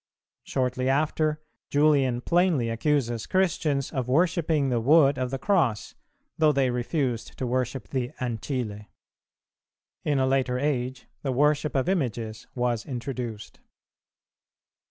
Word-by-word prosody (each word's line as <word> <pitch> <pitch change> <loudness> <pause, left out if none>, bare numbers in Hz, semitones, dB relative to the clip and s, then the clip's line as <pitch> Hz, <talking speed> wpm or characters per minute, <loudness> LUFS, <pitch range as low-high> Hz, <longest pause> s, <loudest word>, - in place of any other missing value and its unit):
Shortly 130 0 -1
after, 155 +2 +1 0.3
Julian 140 -4 +3
plainly 170 -7 +2
accuses 120 -2 0
Christians 155 -7 0
of 130 -3 -2
worshipping 160 0 +2
the 120 -2 +1
wood 140 +1 +5
of 130 -1 -1
the 135 - -3
Cross, 135 - +1 0.5
though 155 -1 +5
they 135 -3 +1
refused 125 -1 -2
to 130 - -2
worship 125 +1 -2
the 125 -3 -2
ancile. 115 -3 -3 1.2
In 145 -2 +1
a 130 - +2
later 130 -1 +1
age 130 -2 -2 0.2
the 135 - -1
worship 150 +3 +2
of 135 +2 +1
images 120 - -2
was 120 -3 0
introduced. 120 -4 -6
130 Hz, 120 wpm, -26 LUFS, 120-150 Hz, 1.2 s, wood